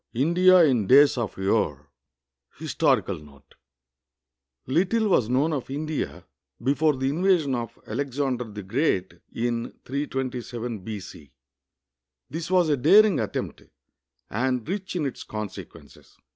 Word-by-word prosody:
IV - - -3
INDIA 180 +4 +5
IN 120 -9 +1
DAYS 140 +3 +6
OF 115 -4 -4
YORE 95 -8 0 0.7
HISTORICAL - - 0
NOTE 75 -2 -18 1.1
Little 195 - +1
was 125 - +2
known 140 +6 +1
of 135 -4 -4
India 150 +2 -4 0.4
before 145 +3 +2
the 130 0 -2
invasion 170 -3 +2
of 120 -2 -4
Alexander 130 +1 -2
the 105 -2 -8
Great, 100 - 0 0.2
in 120 0 -2
327 125 -4 -4
B.C. 95 - -9 1.0
This 165 +2 -5
was 180 -3 +3
a 145 - +2
daring 205 - +5
attempt, - - -4 0.7
and 125 +2 -1
rich 190 +1 -4
in 165 -4 -1
its 135 - -5
consequences. 105 -2 -9
130 Hz, 120 wpm, -25 LUFS, 115-155 Hz, 1.1 s, DAYS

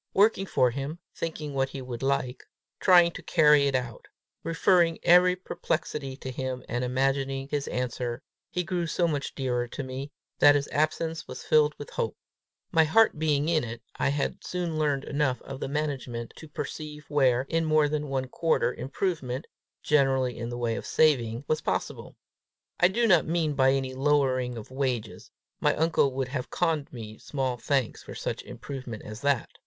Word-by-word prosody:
Working 200 -1 +4
for 125 -7 +3
him, 140 +5 -4 0.2
thinking 155 -3 -4
what 135 0 0
he 135 - -7
would 120 -2 -6
like, 135 -2 -1 0.4
trying 175 -2 +6
to - - -9
carry 150 -3 +5
it 135 - 0
out, 125 -3 -3 0.4
referring 165 0 +3
every 180 +1 +6
perplexity 150 -6 -3
to 130 - -6
him 130 0 -4
and 120 +1 -2
imagining 135 +1 0
his 145 -1 -2
answer, 125 0 -3 0.3
he 180 - -1
grew 175 -1 -2
so 170 +2 +1
much 145 -3 -3
dearer 125 -2 -1
to 140 - -6
me, 130 +2 -6 0.3
that 145 0 +7
his 140 0 0
absence 160 +2 -1
was - - -8
filled 150 -1 +3
with 145 - -9
hope. 110 - -2 0.5
My 160 - +5
heart 160 +2 +4
being 150 -2 +1
in 165 -2 +2
it, 115 0 -7
I - - +1
had 140 0 -2
soon 175 -3 -3
learned 145 -3 +1
enough 140 -3 0
of 135 -1 -7
the - - -3
management 135 -5 -3
to 160 - -10
perceive 150 0 -6
where, 130 -4 +3
in 165 +1 0
more 155 -1 +4
than 150 0 -2
one 130 -1 -1
quarter, 160 -1 +1
improvement, 135 -3 -3 0.4
generally 135 -4 +2
in 115 0 -5
the 120 - -5
way 120 -2 -1
of - - -6
saving, 125 -5 +2
was 155 - 0
possible: - - -3 0.6
I 180 - +7
do 230 +6 +1
not 175 -8 +4
mean 160 -2 +1
by 135 -1 +4
any 135 -1 -1
lowering 130 -3 +1
of 110 +2 -9
wages; 120 -6 -3 0.3
my 150 -1 +2
uncle 160 -3 +2
would 130 -1 -2
have 130 -2 -4
conned 160 -5 0
me 110 -3 -9
small 130 -3 -2
thanks 130 0 -1
for - - -10
such - - -3
improvement 130 -6 -7
as 110 +2 -8
that! 140 -4 0
140 Hz, 180 wpm, -27 LUFS, 130-155 Hz, 0.6 s, that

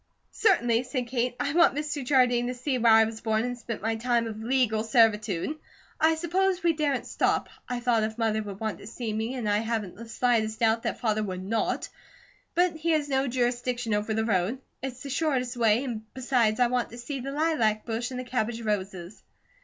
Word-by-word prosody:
"Certainly," 240 - +3
said 255 0 -3
Kate. 245 0 -1
"I 285 - -1
want 340 -3 +5
Mr. 295 -1 -3
Jardine 245 -2 +3
to 250 - -3
see 255 +1 -1
where 230 -1 +5
I 220 0 +8
was 220 0 -4
born 220 -1 +1
and 245 0 -3
spent 230 -3 -6
my 225 0 0
time 235 0 +1
of 220 -1 -6
legal 230 -2 +1
servitude. 225 - +2 0.4
I 320 +1 +4
suppose 360 +2 0
we 340 -1 +4
daren't 295 -4 -1
stop. - - 0 0.2
I 250 -1 -2
doubt 240 -2 +2
if 220 +1 -2
Mother 220 -2 +1
would 200 -2 -7
want 220 -1 -3
to - - -10
see 225 -1 -4
me, 220 +4 -2
and 240 -4 -3
I 205 0 +2
haven't 220 -4 -3
the 230 +1 -10
slightest 225 -2 +1
doubt 225 0 +3
that - - -3
Father 215 -2 +1
would 185 -3 -4
NOT; 220 +3 -1 0.7
but 355 -2 +2
he 325 +2 -2
has 295 -2 0
no 270 0 +1
jurisdiction 245 -1 -1
over 210 +1 0
the 220 0 0
road. 200 +2 +1 0.2
It's 260 -1 -6
the 280 - -6
shortest 265 -4 0
way 230 +1 +3
and 235 -5 -4
besides, 245 -4 +1
I 245 - +6
want 245 0 0
to 235 - -10
see 265 +3 -5
the 270 +2 -5
lilac 275 -9 +1
bush 230 +1 -2
and 255 -1 -5
the - - -3
cabbage 240 -2 -2
roses." 195 -3 -3
240 Hz, 210 wpm, -27 LUFS, 220-260 Hz, 0.7 s, I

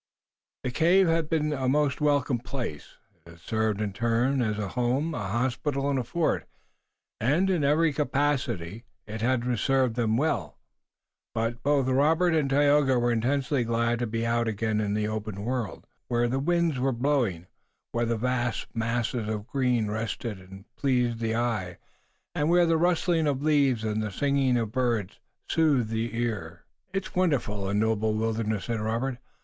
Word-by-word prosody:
The 130 - -2
cave 175 +7 +4
had 165 -1 +1
been 150 -2 +1
a 130 -2 -1
most 145 0 +1
welcome 145 -4 +2
place. 120 - -6 0.3
It - - -16
had 85 0 -14
served 110 +3 -1
in 105 -2 -2
turn 120 +5 +1
as 105 -3 0
a 105 -2 -3
home, 130 +6 0
a 100 -9 -3
hospital 130 +5 -1
and 135 - +1
a - - -1
fort, 165 +6 -1 0.7
and, 160 +11 +2
in 170 -5 +1
every 150 +2 +3
capacity, 130 - -1 0.2
it 110 +1 -6
had 120 +1 +1 0.2
served 130 -2 +1
well, 115 - 0 0.8
but 115 +1 -1
both 140 0 +2
Robert 160 +7 +3
and 150 -4 +1
Tayoga 145 -1 +4
were 120 0 +2
intensely 130 +3 +1
glad 115 0 0
to 120 - -1
be 115 +1 -2
out 115 0 +1
again 110 0 0
in 105 -1 -1
the 105 0 0
open 110 -2 -4
world, 120 -5 -3 0.2
where 120 0 +1
the 130 +3 -1
winds 170 -1 +1
were 135 +1 +1
blowing, 120 - 0 0.5
where 120 0 0
vast 120 +1 -1
masses 115 0 -1
of 105 -1 -3
green 125 -3 +1
rested 110 0 -3
and 95 +2 -13
pleased 125 -4 +1
the 115 -1 -1
eye, 110 -7 -1 0.6
and 150 +2 0
where 175 0 +5
the 165 0 +2
rustling 170 -1 +2
of 140 -1 -1
leaves 140 -7 +3
and 110 0 -1
the 105 - -2
singing 135 +2 +1
of 115 -3 -2
birds 120 -6 -1 0.3
soothed 145 -8 +2
the 115 +1 -2
ear. 100 -8 -3 0.3
"It's 195 0 -3
a - - -3
wonderful, 110 - 0
a 100 - -1
noble 110 0 +1
wilderness!" 110 -2 -1
said 115 -2 -2
Robert. 115 +4 -2
120 Hz, 165 wpm, -27 LUFS, 110-140 Hz, 0.8 s, where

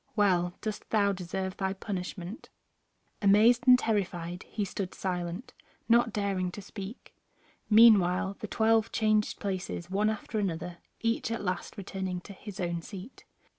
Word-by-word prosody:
Well 180 -4 +2
dost 215 -1 -5
thou 205 -2 +3
deserve 190 +1 -4
thy 190 -1 -1
punishment." 190 0 -6 0.7
Amazed 225 +5 +5
and 250 0 +9
terrified 180 -6 -2
he 210 -2 -2
stood 190 -1 -5
silent, 180 +3 -4 0.3
not 235 0 +4
daring 195 -3 -1
to 205 - -7
speak. 200 +3 -9 0.6
Meanwhile 200 -4 +6
the 215 - -5
twelve 225 +1 +2
changed 215 -1 +1
places 185 -3 -4
one 210 +2 +2
after 215 0 -3
another, 175 -3 -3 0.2
each 230 0 0
at 230 -1 -3
last 185 +3 -3
returning 190 -2 -4
to 200 - -11
his 205 +1 -10
own 170 -2 -1
seat. 195 +7 -10
200 Hz, 140 wpm, -29 LUFS, 180-215 Hz, 0.7 s, and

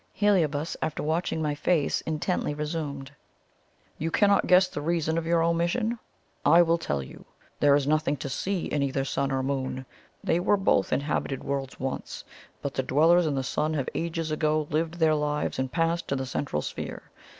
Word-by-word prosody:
Heliobas, 165 -7 +1
after 155 - -2
watching 160 +1 -1
my 150 -1 0
face 150 0 +1
intently, 155 -1 -1
resumed: 150 -3 -4 0.9
"You 160 - -1
cannot 200 +3 +3
guess 185 +1 +6
the 145 - -5
reason 160 0 0
of 165 0 -2
your 165 -1 +3
omission? 175 +8 0 0.4
I 175 +1 +7
will 170 0 +2
tell 70 - -2
you. - - -12 0.4
There 145 -1 +5
is 145 -1 +1
nothing 155 0 +1
to 135 - -5
see 185 +7 -2
in 145 - -1
either 135 -1 0
Sun 140 0 -1
or 135 0 0
Moon. 130 -1 -2 0.4
They 170 - +2
were 205 +3 +3
both 190 - +2
inhabited 140 -1 -1
worlds 135 -1 -3
once; 130 0 -4 0.4
but 140 - -3
the - - 0
dwellers 160 +6 +4
in 145 - 0
the 135 - -1
Sun 155 +4 -1
have 135 -4 -1
ages 165 -1 -2
ago 155 0 +1
lived 160 +2 0
their 160 -2 +3
lives 150 -2 -1
and 130 -1 -1
passed 165 +4 0
to 140 - 0
the 130 0 -2
Central 80 - -2
Sphere. - - -6
155 Hz, 185 wpm, -27 LUFS, 140-170 Hz, 0.9 s, I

